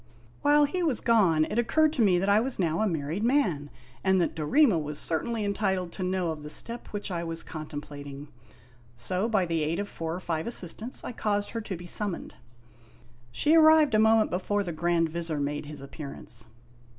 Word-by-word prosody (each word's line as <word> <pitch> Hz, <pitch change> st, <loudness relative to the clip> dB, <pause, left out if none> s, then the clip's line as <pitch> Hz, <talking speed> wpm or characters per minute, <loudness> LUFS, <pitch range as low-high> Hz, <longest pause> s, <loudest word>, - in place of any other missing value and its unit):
While 290 Hz, 0 st, +5 dB
he 360 Hz, +6 st, -2 dB
was 305 Hz, -9 st, +1 dB
gone 190 Hz, -10 st, +3 dB
it 215 Hz, -, -2 dB
occurred 310 Hz, +6 st, +3 dB
to 255 Hz, -, 0 dB
me 190 Hz, -5 st, +4 dB
that 190 Hz, +2 st, 0 dB
I 200 Hz, +1 st, +5 dB
was 250 Hz, +3 st, -2 dB
now 170 Hz, 0 st, 0 dB
a 220 Hz, -, +2 dB
married 165 Hz, +2 st, -2 dB
man, 200 Hz, -, +1 dB, 0.3 s
and 190 Hz, 0 st, +3 dB
that 175 Hz, -, 0 dB
Dorema 185 Hz, -, +3 dB
was 150 Hz, 0 st, -4 dB
certainly 210 Hz, +9 st, -1 dB
entitled 190 Hz, -3 st, -1 dB
to -, -, -6 dB
know 185 Hz, -2 st, 0 dB
of 155 Hz, -1 st, -7 dB
the 150 Hz, -, -8 dB
step 235 Hz, +9 st, -3 dB
which 205 Hz, -1 st, -5 dB
I 170 Hz, -1 st, -2 dB
was 165 Hz, 0 st, -3 dB
contemplating. 145 Hz, -2 st, -8 dB, 0.7 s
So, 185 Hz, -, +1 dB
by 200 Hz, -5 st, +2 dB
the 165 Hz, -2 st, -1 dB
aid 155 Hz, +3 st, -1 dB
of 205 Hz, -, -2 dB
four 165 Hz, -3 st, -4 dB
or -, -, -5 dB
five 165 Hz, -3 st, -3 dB
assis 185 Hz, -8 st, 0 dB
tants, 235 Hz, +4 st, -3 dB
I -, -, -5 dB
caused 205 Hz, -3 st, -1 dB
her 230 Hz, -, -3 dB
to 200 Hz, -4 st, -5 dB
be 175 Hz, -, -10 dB
summoned. 195 Hz, 0 st, -2 dB, 1.0 s
She 300 Hz, -, +2 dB
arrived 315 Hz, -3 st, +6 dB
a 215 Hz, -, +4 dB
moment 220 Hz, 0 st, +4 dB
before 205 Hz, +3 st, 0 dB
the 175 Hz, -3 st, -4 dB
Grand 170 Hz, +1 st, +1 dB
Vizir 165 Hz, -2 st, -3 dB
made 145 Hz, +1 st, -3 dB
his 150 Hz, -2 st, -8 dB
appearance. 135 Hz, -5 st, -8 dB
185 Hz, 200 wpm, -27 LUFS, 160-220 Hz, 1.0 s, arrived